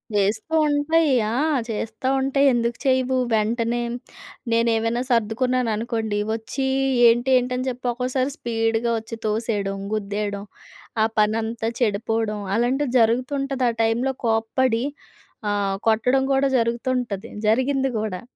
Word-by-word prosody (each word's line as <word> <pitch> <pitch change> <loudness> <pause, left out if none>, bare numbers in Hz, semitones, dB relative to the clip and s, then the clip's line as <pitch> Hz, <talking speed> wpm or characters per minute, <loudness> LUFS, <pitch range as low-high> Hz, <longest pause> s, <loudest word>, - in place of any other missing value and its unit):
చేస్తూ 210 +9 0
ఉంటయి. 295 +1 +2 0.2
ఆ! - - -2 0.4
చేస్తా 225 +3 -4
ఉంటయి, 275 +1 +2
ఎందుకు 235 0 0
చేయవు. 260 0 +2 0.2
వెంటనే 230 +2 0 0.7
నేనేవైనా 230 +1 +1
సర్దుకున్నాననుకోండి, 230 -2 0
వచ్చి 230 +4 -3 0.4
ఏంటి, 240 +3 +1
ఏంటని 250 +1 -1
చెప్పి 250 0 -7
ఒక్కోసారి 255 +2 -1
స్పీడ్‌గా 225 0 0
వచ్చి 225 +1 -8
తోసేయడం, 210 -2 -1 0.2
గుద్దేయడం, 205 -1 -3 0.6
ఆ - - +5
పనంతా 225 +1 0
చెడిపోడం, 220 -1 0 0.2
అలాంటివి 250 +3 0
జరుగుతుంటది. 255 +3 +1
ఆ - - +1
టైంలో 235 +4 +1
కోప్పడి, 225 +2 +1 0.7
ఆహ్, 200 -1 0
కొట్టడం 250 +5 +3
కూడా 270 +1 +3
జరుగుతుంటది. 235 -2 -1 0.2
జరిగింది 265 +4 +2
గూడా. 210 -4 -3
230 Hz, 110 wpm, -23 LUFS, 220-255 Hz, 0.7 s, ఆ